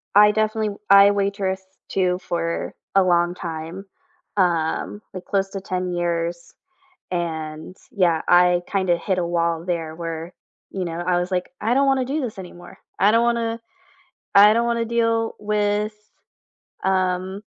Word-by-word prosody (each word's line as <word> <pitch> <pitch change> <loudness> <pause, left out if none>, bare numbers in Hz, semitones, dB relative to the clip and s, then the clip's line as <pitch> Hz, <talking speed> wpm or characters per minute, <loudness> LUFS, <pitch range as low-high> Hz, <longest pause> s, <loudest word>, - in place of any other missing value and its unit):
I 210 0 +8
definitely 215 -1 -1
I 200 0 +8
waitress 195 -1 -1 0.3
too 185 -1 +1
for 170 -1 -3 0.2
a 195 - +6
long 175 -1 +2
time, 165 +3 -6 0.5
um, 175 +3 0
like, 185 - -7
close 195 -1 0
to 195 - -5
10 185 -2 -3
years, 170 0 -2 0.6
and, 160 -1 -4 0.2
yeah, 175 -5 +2
I 175 0 +5
kinda 185 -3 +1
hit 185 +1 -2
a 170 - 0
wall 170 -1 0
there 165 -3 -2
where, 165 +1 -6 0.4
you 190 -2 -3
know, 165 0 -5
I 175 -1 +2
was 180 +2 -3
like, 180 -1 -2
"I 230 +4 +1
don't 275 +1 +3
wanna 265 -1 +2
do 295 +3 -1
this 220 -5 -5
anymore. 175 -1 -11 0.2
I 200 +2 +5
don't 230 +1 +4
wanna 230 -1 0 0.7
I 205 +1 +8
don't 235 +1 +1
wanna 235 -1 0
deal 230 -1 0
with, 210 0 0 0.9
um, 185 +1 0
185 Hz, 150 wpm, -22 LUFS, 175-210 Hz, 0.9 s, I